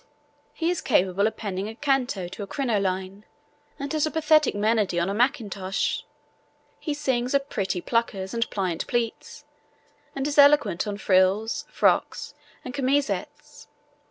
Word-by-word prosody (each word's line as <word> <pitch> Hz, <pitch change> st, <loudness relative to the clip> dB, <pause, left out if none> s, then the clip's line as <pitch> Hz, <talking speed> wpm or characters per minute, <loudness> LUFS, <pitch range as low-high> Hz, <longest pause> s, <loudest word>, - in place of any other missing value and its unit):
He 335 Hz, +1 st, 0 dB
is 360 Hz, -, -2 dB
capable 190 Hz, +3 st, +2 dB
of 220 Hz, -, -5 dB
penning 200 Hz, -1 st, -4 dB
a 225 Hz, -, -8 dB
canto 250 Hz, -9 st, 0 dB
to 190 Hz, +4 st, -9 dB
a 200 Hz, -, -5 dB
crinoline, 195 Hz, -6 st, -2 dB, 0.5 s
and 280 Hz, +1 st, -5 dB
has 310 Hz, 0 st, +1 dB
a -, -, -1 dB
pathetic 310 Hz, -3 st, +3 dB
monody 210 Hz, -4 st, +1 dB
on 170 Hz, +3 st, 0 dB
a -, -, -1 dB
mackintosh. 205 Hz, -5 st, 0 dB, 0.8 s
He 300 Hz, -3 st, -3 dB
sings 260 Hz, -3 st, 0 dB
of 275 Hz, 0 st, 0 dB
pretty 190 Hz, -3 st, -1 dB
puckers 210 Hz, -4 st, -1 dB
and 230 Hz, 0 st, -1 dB
pliant 185 Hz, -5 st, -2 dB
pleats, 235 Hz, -2 st, -3 dB, 0.7 s
and 275 Hz, -1 st, -2 dB
is 290 Hz, 0 st, +1 dB
eloquent 280 Hz, -11 st, +5 dB
on 205 Hz, -1 st, -3 dB
frills, 195 Hz, +3 st, +2 dB
frocks -, -, +1 dB, 0.3 s
and 250 Hz, -, -6 dB
chemisettes. 275 Hz, +1 st, -2 dB
225 Hz, 145 wpm, -25 LUFS, 195-275 Hz, 0.8 s, eloquent